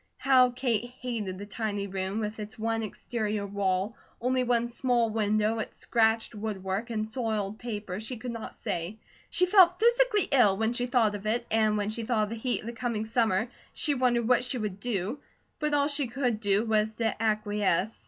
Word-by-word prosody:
How 255 -2 +5
Kate 240 -2 -1
hated 220 -7 -3
the 200 - -7
tiny 205 -1 -3
room 190 +2 -2
with 215 +1 -4
its 210 0 -7
one 225 0 -1
exterior 215 -1 -3
wall, 195 +1 -1 0.2
only 255 +1 +1
one 240 -1 +1
small 240 -1 +1
window, 215 +1 +1
its 220 - -5
scratched 225 -1 +1
woodwork, 205 0 -3
and 215 -2 -2
soiled 220 -3 -2
paper, 210 -5 -5
she 230 +3 -5
could 245 +2 -5
not 230 -1 -7
say. 175 +6 -3 0.3
She 360 +2 +3
felt 360 -2 +6
physically 475 -2 +3
ill 215 -8 +5
when 220 +2 +1
she 245 0 -1
thought 235 -4 +3
of 205 0 -5
it, 235 +2 +1
and 215 -1 +3
when 205 0 -1
she 230 - -4
thought 220 -2 +1
of 210 - -2
the 230 - -4
heat 245 +2 -1
of - - -12
the 235 - -5
coming 230 -2 -2
summer, 220 -1 +1 0.2
she 295 - +2
wondered 245 -3 +1
what 250 0 +4
she 250 +1 0
would 210 -4 -4
do; 220 +3 -2 0.4
but 300 -1 +1
all 285 0 +3
she 285 -2 +1
could 245 -2 -1
do 205 +1 +2
was 220 -1 +1
to 225 -1 0
acquiesce. 210 -2 0
225 Hz, 195 wpm, -28 LUFS, 210-245 Hz, 0.4 s, felt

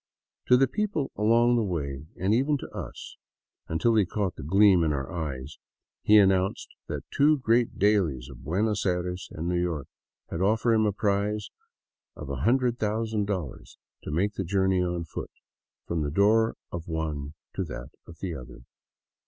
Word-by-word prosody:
To 125 - +7
the 135 +1 +4
people 160 - -2
along 115 +3 +4
the - - +2
way 75 -7 -3
— - - -23
and 95 +4 +2
even 140 +5 +2
to - - -8
us, - - -8 0.5
until 100 +9 +1
he 110 -2 +5
caught 95 0 -2
the - - -8
gleam 95 +4 +5
in 80 - +1
our 65 -2 -3
eyes 75 -4 -5 0.2
— - - -65
he 105 - +6
announced 95 -1 +3 0.2
that - - -4
two 150 +2 +4
great 120 -2 +1
dailies 90 -11 +2
of 65 -2 -12
Buenos 100 +7 0
Aires 90 -1 -2
and 80 +2 -4
New 90 0 +1
York 80 -6 -2 0.5
had 85 - -3
offered 110 +4 +3
him 110 -1 +3
a - - +2
prize 105 +1 -1 0.6
of 75 - -8
$100,000 105 - -1 0.3
to - - -5
make 100 +7 0
the 95 - -3
journey 95 0 +2
on 90 -1 -1
foot - - -6 0.6
from 85 -2 -2
the 75 - -1
door 110 +7 +3 0.2
of 85 -1 -6
one 75 -3 -3 0.2
to - - -2
that - - -8 0.2
of 85 - -12
the 95 -3 -3
other. 65 -4 -10
95 Hz, 170 wpm, -27 LUFS, 80-110 Hz, 0.6 s, To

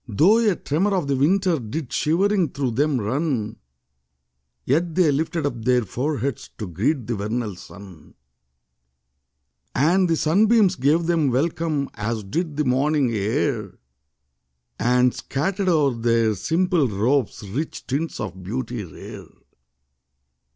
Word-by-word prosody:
5 105 -5 -8
Though 200 +8 +6
a 190 - +1
tremor 185 +9 0
of 175 -6 -1
the 140 - +1
winter 175 +4 +2
Did 125 +4 -5
shivering 185 +2 +2
through 135 -3 -1
them 140 +3 +1
run; 115 -1 -2 1.1
Yet 160 +5 0
they 175 -5 +4
lifted 160 +2 -1
up 120 -5 -3
their 125 0 +3
foreheads 130 +3 -3
To 105 - -4
greet 110 - -1
the 120 - -2
vernal 105 0 -3
sun. 95 -2 -13 1.6
And 175 +7 +3
the 165 - +3
sunbeams 200 +4 +3
gave 155 +4 +2
them 165 -4 +2
welcome. 150 +2 0
As 110 0 -3
did 155 - -3
the 150 - +1
morning 135 +1 +2
air 110 0 -1 1.0
And 125 +1 +3
scattered 190 +7 -2
o'er 150 -6 +3
their 115 -1 +1
simple 165 - +1
robes 110 +1 0
Rich 140 +11 -4
tints 145 +5 -3
of 95 - -5
beauty 115 +3 -4
rare. 80 -6 -10
140 Hz, 130 wpm, -23 LUFS, 115-165 Hz, 1.6 s, Though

